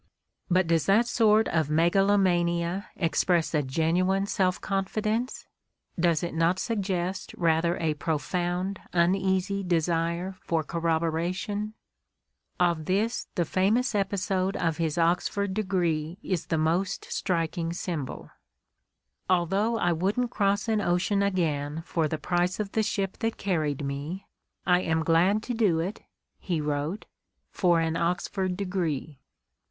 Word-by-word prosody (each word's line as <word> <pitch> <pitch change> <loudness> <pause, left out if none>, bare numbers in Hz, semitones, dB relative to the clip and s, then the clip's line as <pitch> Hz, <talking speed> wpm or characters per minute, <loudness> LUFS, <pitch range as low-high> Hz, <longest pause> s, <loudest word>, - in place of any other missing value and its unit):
But 185 0 +3
does 165 -3 +1
that 215 +5 +5
sort 220 -2 +3
of 160 -3 +1
megalomania 175 +1 +2
express 170 -1 +1
a 150 - +3
genuine 170 +8 +1
self 185 -2 0
confi 195 +2 -2
dence? 230 +4 -1 0.5
Does 170 -2 +2
it 170 - -3
not 165 +3 +2
suggest 190 -4 -2
rather 170 0 +2
a 160 -2 0
profound, 175 +5 -2
uneasy 190 +2 +1
desire 170 +1 0
for 165 -2 0
corroboration? 170 +7 -1 0.8
Of 170 -3 +2
this 215 +7 0
the 175 - +1
famous 220 - +1
episode 195 -1 0
of 165 -2 0
his 165 -1 -1
Oxford 180 +4 +1
degree 175 -5 -1
is 180 -4 -2
the 160 - 0
most 175 +5 0
striking 165 -2 -1
symbol. 170 -5 -5 1.0
"Al 180 -2 +3
though 205 +6 0
I 175 -5 +2
wouldn't 205 +9 0
cross 200 0 +1
an 220 -2 +1
ocean 185 +2 +1
again 160 -6 -1
for 165 -2 0
the 155 - -2
price 175 +5 0
of 205 -2 -3
the 220 - +1
ship 200 -3 -2
that 225 -1 -1
carried 155 -7 -1
me, 145 +8 -4 0.4
I 180 0 +4
am 160 -2 0
glad 180 +6 +3
to 245 - -3
do 210 -8 +2
it," 185 +6 -3 0.4
he 175 -4 -2
wrote, 150 +6 -2 0.5
"for 175 -3 +3
an 165 0 0
Oxford 180 +2 -1
degree." 165 -7 -2
180 Hz, 135 wpm, -27 LUFS, 165-195 Hz, 1.0 s, that